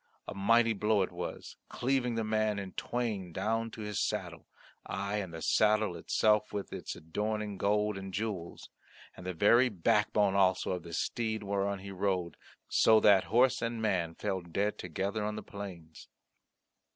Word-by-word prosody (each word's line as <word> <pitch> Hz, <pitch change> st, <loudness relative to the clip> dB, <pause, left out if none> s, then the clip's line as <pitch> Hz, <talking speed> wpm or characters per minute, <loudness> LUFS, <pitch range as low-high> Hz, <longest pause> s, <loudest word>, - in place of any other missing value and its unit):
A -, -, -5 dB
mighty 115 Hz, +3 st, +3 dB
blow 105 Hz, -1 st, +2 dB
it 95 Hz, -, -4 dB
was, 90 Hz, 0 st, -6 dB
cleaving 125 Hz, -2 st, 0 dB
the 115 Hz, -, 0 dB
man 110 Hz, -1 st, 0 dB
in 100 Hz, -2 st, -5 dB
twain 110 Hz, -8 st, -3 dB
down 115 Hz, +6 st, -1 dB
to 110 Hz, -, -9 dB
his 105 Hz, -1 st, -3 dB
saddle -, -, -3 dB, 0.4 s
aye, 100 Hz, +2 st, -3 dB
and 95 Hz, -4 st, -4 dB
the 80 Hz, 0 st, -7 dB
saddle 110 Hz, -3 st, +3 dB
itself 105 Hz, +3 st, +2 dB
with 100 Hz, -1 st, -5 dB
its -, -, -5 dB
adorning 105 Hz, +6 st, -3 dB
of -, -, -8 dB
gold 105 Hz, 0 st, +1 dB
and 95 Hz, 0 st, -7 dB
jewels, 100 Hz, -4 st, -5 dB, 0.4 s
and 90 Hz, -, -9 dB
the 95 Hz, -, -2 dB
very 120 Hz, +8 st, +5 dB
backbone 105 Hz, +1 st, +2 dB
also 95 Hz, -2 st, +2 dB
of 90 Hz, -1 st, -2 dB
the 85 Hz, 0 st, -10 dB
steed 110 Hz, +4 st, -2 dB
whereon 100 Hz, 0 st, -1 dB
he 100 Hz, +1 st, -9 dB
rode, 95 Hz, -3 st, -1 dB, 0.3 s
so 110 Hz, -1 st, +5 dB
that 100 Hz, -3 st, +5 dB
horse 125 Hz, +3 st, +3 dB
and 115 Hz, -1 st, -2 dB
man 90 Hz, -7 st, 0 dB
fell 95 Hz, -1 st, -2 dB
dead 100 Hz, +5 st, -2 dB
together 95 Hz, +5 st, -3 dB
on 105 Hz, 0 st, -2 dB
the 110 Hz, -, -6 dB
plains. 90 Hz, -7 st, -9 dB
100 Hz, 170 wpm, -31 LUFS, 95-110 Hz, 0.4 s, very